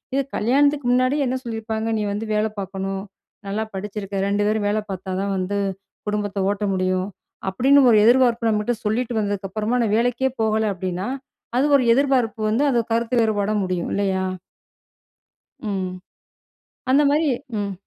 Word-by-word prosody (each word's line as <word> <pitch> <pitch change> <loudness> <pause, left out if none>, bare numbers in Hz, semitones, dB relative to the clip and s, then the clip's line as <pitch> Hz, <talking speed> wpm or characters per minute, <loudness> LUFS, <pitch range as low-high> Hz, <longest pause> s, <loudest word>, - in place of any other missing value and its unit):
இது 275 - +3
கல்யாணத்துக்கு 285 +4 +2
முன்னாடி 255 +3 +3
என்ன 255 0 -1
சொல்லியிருப்பாங்க. 225 -1 -3
"நீ - - -1
வந்து 210 +2 -3
வேல 210 +1 +2
பார்க்கணும். 195 0 -4 0.4
நல்லா 205 +3 -1
படிச்சிருக்க. 200 0 -5
ரெண்டு 205 +1 +1
பேரும் 215 -1 0
வேல 210 +1 +1
பார்த்தா 190 0 -5
தான் 200 0 -1
வந்து 185 +2 -2 0.5
குடும்பத்த 205 -1 -2
ஓட்ட 205 +1 -3
முடியும்." 185 0 0 0.4
அப்பிடின்னு 270 +8 +4
ஒரு 220 - +6
எதிர்பார்ப்பு 235 -2 +4
நம்மட்ட 210 +2 +1
சொல்லிட்டு 235 +3 0
வந்ததுக்கு 205 -2 -2
அப்பறமா 220 +4 -1
நான் 215 -2 +1
வேலைக்கே 245 +3 +1
போகல 220 0 +1
அப்பிடின்னா, 185 +1 -3 0.5
அது 265 - +3
ஒரு 265 - +1
எதிர்பார்ப்பு 255 -5 +1
வந்து 230 +6 +2
அது 240 - +2
கருத்து 235 +1 0
வேறுபாடா 215 -2 +1
முடியும். 180 -2 -2
இல்லயா! 190 -2 0 1.4
ம். 190 -2 -2 1.0
அந்தமாரி 290 +2 +4 0.3
ம். 200 -1 -2
215 Hz, 145 wpm, -22 LUFS, 200-245 Hz, 1.4 s, ஒரு